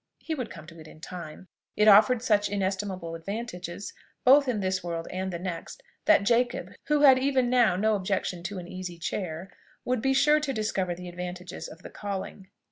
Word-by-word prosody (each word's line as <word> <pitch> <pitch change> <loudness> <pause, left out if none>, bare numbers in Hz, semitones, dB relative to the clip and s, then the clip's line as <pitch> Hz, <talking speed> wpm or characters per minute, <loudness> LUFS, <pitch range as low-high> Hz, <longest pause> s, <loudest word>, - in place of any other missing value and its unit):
He 325 - -5
would 255 -7 -4
come 155 - -10
to 165 +1 -13
it 155 - -12
in 155 - -14
time. 170 +1 -9 0.3
It 210 +1 +4
offered 220 +4 +7
such 210 -4 +2
inestimable 190 -3 -2
advantages 180 0 -6 0.3
both 275 +2 +6
in 240 -4 0
this 190 -1 -1
world 165 -1 -4
and 190 +1 -3
the 170 - -3
next, 180 - -6 0.2
that 315 -10 +5
Jacob, 240 +3 +1 0.2
who 300 0 +2
had 265 -3 +8
even 260 -2 +1
now 240 -7 +4
no 215 +4 +2
objection 190 -2 -2
to 195 +2 -4
an 175 -1 -7
easy 180 -1 -7
chair, 170 +1 -4 0.3
would 250 -2 0
be 270 +2 +2
sure 300 +3 +5
to 290 -3 -2
discover 195 -5 -1
the 180 +1 -9
advantages 180 0 -6
of 165 +3 -13
the - - -9
calling. 195 -1 -6
195 Hz, 195 wpm, -27 LUFS, 180-240 Hz, 0.3 s, had